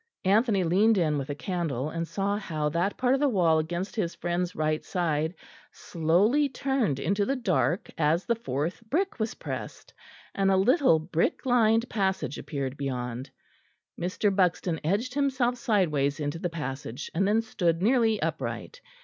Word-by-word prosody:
Anthony 205 0 +3
leaned 200 +6 +3
in 155 -5 +1
with 135 - -5
a 145 - -2
candle, 155 -5 -2
and 165 0 -3
saw 200 +2 -1
how 155 -7 -2
that 175 +6 -1
part 255 0 +2
of 270 - +2
the 290 0 +3
wall 170 -8 +3
against 175 +5 -3
his 180 -7 -2
friend's 175 +1 -2
right 155 0 0
side 160 -2 -1 0.4
slowly 200 - +2
turned 255 - 0
into 195 +8 +1
the 270 +7 0
dark 190 -6 0
as 160 +3 +2
the 235 - +2
fourth 165 - -3
brick 365 - 0
was 220 0 -2
pressed, - - -7 0.4
and 195 -1 +1
a 190 - +4
little 250 - +4
brick 160 +7 -1
lined 230 -2 +3
passage 190 - -1
appeared 140 -2 -4
beyond. 125 -1 -4 0.7
Mr. 195 +3 0
Buxton 180 -3 +1
edged 205 +10 0
himself 265 -3 +1
sideways 165 - +1
into 145 +2 -3
the 175 - -2
passage, 135 -6 -5
and 195 +4 +1
then 220 +2 +2
stood 175 -6 0
nearly 225 -2 +3
upright. 485 - -4
180 Hz, 160 wpm, -27 LUFS, 155-225 Hz, 0.7 s, a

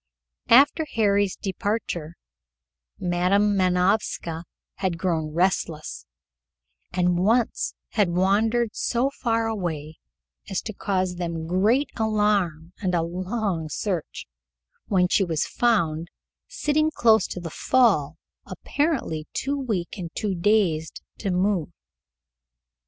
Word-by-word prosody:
After 285 +6 +6
Harry's 205 -3 +2
departure, 190 -5 -3 0.8
Madam 185 +4 +2
Manovska 180 -2 +1 0.3
had 185 -3 -1
grown 165 -3 -1
restless, 170 -2 -1 0.8
and 180 -1 +1
once 225 +5 +1
had 205 -5 +2
wandered 210 +6 +2
so 255 +3 0
far 230 -4 0
away 165 -8 -4 0.5
as 190 - -1
to 215 - -5
cause 185 -3 -1
them 170 -2 -3
great 210 - +2
alarm 205 -7 0
and 185 -3 0
a 165 - +2
long 180 -1 -2
search, 175 +1 -3 0.6
when 185 -3 +3
she 195 - +3
was 165 -4 -1
found, 170 -9 +1 0.4
sitting 310 -11 +1
close 220 -8 +4
to - - -6
the 170 -2 -6
fall, 170 - +2 0.3
apparently 275 - -2
too 280 +1 -1
weak 215 -11 -3
and 170 -2 -5
too 205 -2 -1
dazed 175 -4 +1 0.2
to 200 - -2
move. 185 -2 +1
190 Hz, 110 wpm, -24 LUFS, 170-220 Hz, 0.8 s, After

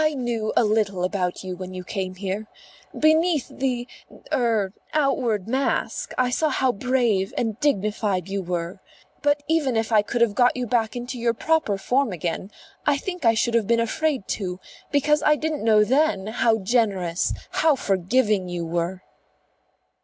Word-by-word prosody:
"I 310 -1 +1
knew 235 -4 -2
a 240 - +6
little 210 -4 +1
about 180 -1 -1
you 185 -1 -5
when 185 0 -7
you 185 - -6
came 185 -1 -4
here. 195 +3 -4 0.5
Beneath 315 -1 +3
the 250 -2 -2 0.5
er 220 -6 +1 0.2
outward 255 -9 +1
mask 265 +4 -1
I 250 -1 +2
saw 310 +5 +1
how 260 -2 +2
brave 235 -4 0
and 225 -1 -1
dignified 205 - 0
you 195 0 -2
were. 175 0 -4 0.4
But 290 0 +1
even 295 -7 +1
if 225 0 -1
I 215 -2 +5
could 235 +3 -3
have 230 -3 +4
got 245 +2 +3
you 250 - -1
back 225 -1 0
into 245 +1 -5
your 235 0 +1
proper 315 -8 +1
form 250 +5 +1
again, 175 +2 -3 0.3
I 290 -1 +2
think 360 -1 -5
I 225 0 +5
should 230 +1 +1
have 230 -4 +2
been 235 0 +3
afraid 260 +1 -1
to; 185 -3 -3 0.3
because 300 +1 +3
I 300 - +4
didn't 310 -2 -3
know 215 -1 +5
then 260 -4 +2
how 225 +1 +2
generous, 195 -5 0 0.2
how 315 -2 +3
forgiving 200 -2 +1
you 175 -1 -3
were." 175 +2 -2
225 Hz, 170 wpm, -24 LUFS, 195-260 Hz, 0.5 s, a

